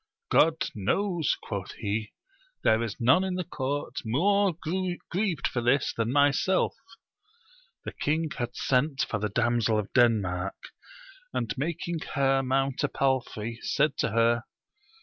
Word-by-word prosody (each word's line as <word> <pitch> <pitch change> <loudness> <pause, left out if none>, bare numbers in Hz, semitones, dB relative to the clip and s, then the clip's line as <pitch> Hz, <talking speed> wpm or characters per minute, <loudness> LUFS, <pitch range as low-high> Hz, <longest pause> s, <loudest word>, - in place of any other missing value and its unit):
God 160 0 +3
knows, 165 - 0
quoth 100 -3 -5
he, 105 0 -3 0.5
there 110 +1 +4
is 115 -3 -4
none 130 +10 +4
in 190 -1 -2
the 180 - -1
court 145 -4 -4
more 185 - +2 0.5
grieved 185 -3 0
for 120 - -2
this 125 +3 +2
than 115 +1 -1
myself. 145 +7 +3 1.1
The - - -4
king 155 +1 -1
had 120 -1 -3
sent 135 +2 +1
for 105 - -2
the 105 +1 -1
Damsel 115 0 +1
of 105 -2 -3
Denmark, 100 -6 +2 0.8
and - - -1
making 165 +3 -3 0.2
her 135 -1 +3
mount 135 +1 0
a - - +3
palfrey, 120 -5 -1
said 150 -1 +1
to - - +1
her. 115 +2 +2
130 Hz, 135 wpm, -27 LUFS, 115-155 Hz, 1.1 s, there